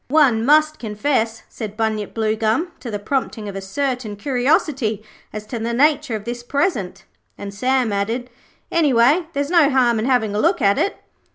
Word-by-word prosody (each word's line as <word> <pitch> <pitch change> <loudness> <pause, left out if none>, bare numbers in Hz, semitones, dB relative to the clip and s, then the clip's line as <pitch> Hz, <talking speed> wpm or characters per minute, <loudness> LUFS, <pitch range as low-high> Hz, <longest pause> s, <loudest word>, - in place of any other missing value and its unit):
'One 265 -6 +3
must 305 +3 +3
confess,' 225 +1 -1
said 215 -2 -7
Bunyip 220 -2 -2
Bluegum, 220 +9 0
'to 245 - -7
the 210 - -3
prompting 220 -1 -3
of 200 - -6
a 195 - -4
certain 250 +1 -3
curiosity 250 -2 0 0.3
as 215 0 -7
to 235 +2 -5
the 235 +1 -2
nature 295 -2 +2
of 210 - -5
this 240 0 -5
present'; 240 - -2 0.3
and 200 0 -7
Sam 250 +1 0
added, 230 +5 -2 0.4
'Anyway, 295 +1 +3
there's 285 +2 -2
no 330 -5 +5
harm 245 -4 +2
in 220 - -1
having 245 -5 +1
a 205 - -1
look 345 - +2
at 200 -4 +3
it.' 400 - 0
240 Hz, 175 wpm, -20 LUFS, 215-280 Hz, 0.4 s, no